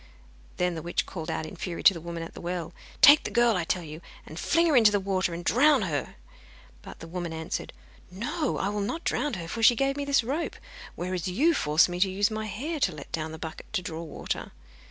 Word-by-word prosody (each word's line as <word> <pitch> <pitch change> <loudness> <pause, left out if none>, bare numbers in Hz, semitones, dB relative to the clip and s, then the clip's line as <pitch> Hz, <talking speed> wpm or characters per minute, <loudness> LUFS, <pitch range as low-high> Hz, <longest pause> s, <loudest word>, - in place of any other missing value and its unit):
Then 180 0 +1
the 160 - -5
witch 175 +2 -1
called 160 -4 -6
out - - -2
in 155 - -9
fury 175 -3 -5
to 195 - +8
the 165 - -8
woman 170 0 -5
at 165 - -9
the - - -10
well: 175 -1 -4 0.3
'Take 290 +1 +9
the - - -3
girl, 235 -2 +3
I 180 - 0
tell 175 +2 -1
you, 155 +1 -9 0.2
and 155 - -9
fling 335 - +2
her 320 -4 +3
into 225 -4 +7
the 205 - +2
water, 190 -2 0
and 170 +1 -6
drown 275 0 +4
her!' 150 -6 -3 0.7
But - - -12
the 165 - -8
woman 175 0 -4
answered: 160 0 -4 0.4
'No, 250 - -2
I 195 - -1
will 210 0 -2
not 325 +12 -3
drown 295 -5 -1
her, 170 -3 -6
for 225 +7 -4
she 235 +2 +7
gave 275 +2 +1
me 285 - -2
this 280 -3 +3
rope, 285 +8 -2 0.4
whereas 180 0 -3
you 275 - +3
forced 150 - +3
me 175 0 -5
to 190 +1 +3
use 205 +3 +1
my 215 0 -3
hair 295 +10 -4
to 195 - +2
let 145 - -10
down 160 -1 -3
the 160 - -7
bucket 160 0 -8
to 185 - -1
draw 165 -2 -5
water. 165 - -5
185 Hz, 240 wpm, -27 LUFS, 170-240 Hz, 0.7 s, Take